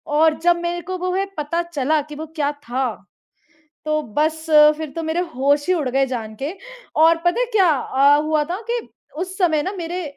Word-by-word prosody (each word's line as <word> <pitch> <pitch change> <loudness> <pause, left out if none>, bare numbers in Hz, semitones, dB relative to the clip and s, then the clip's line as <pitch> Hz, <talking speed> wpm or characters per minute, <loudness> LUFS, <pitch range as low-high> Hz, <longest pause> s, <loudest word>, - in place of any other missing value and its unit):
और 315 0 +4
जब 345 +1 +3
मेरे 345 0 -2
को 370 +1 -5
वो 365 0 -2
है 385 +1 0
पता 300 +3 -1
चला 310 -2 0
कि 300 +1 -10
वो 315 - -6
क्या 290 -2 0
था, 265 -3 -3 1.0
तो 305 0 0 0.2
बस 315 +1 +1 0.3
फिर 315 -2 -6
तो 330 - -3
मेरे 320 +2 -1 0.2
होश 285 +4 +2
ही 370 - +3
उड़ 295 -7 -1
गए 270 +2 +2
जान 225 -4 -5
के 295 +6 -2 0.5
और 330 +1 +6
पता 350 +6 +2
है - - +2
क्या 385 -5 +4
अ, 280 +1 +3
हुआ 305 0 +1
था 355 +7 -5
कि 475 0 0 0.4
उस 375 +2 -4
समय 320 -5 +2
ना 375 - -2
मेरे 350 0 -4
315 Hz, 205 wpm, -21 LUFS, 290-350 Hz, 1.0 s, और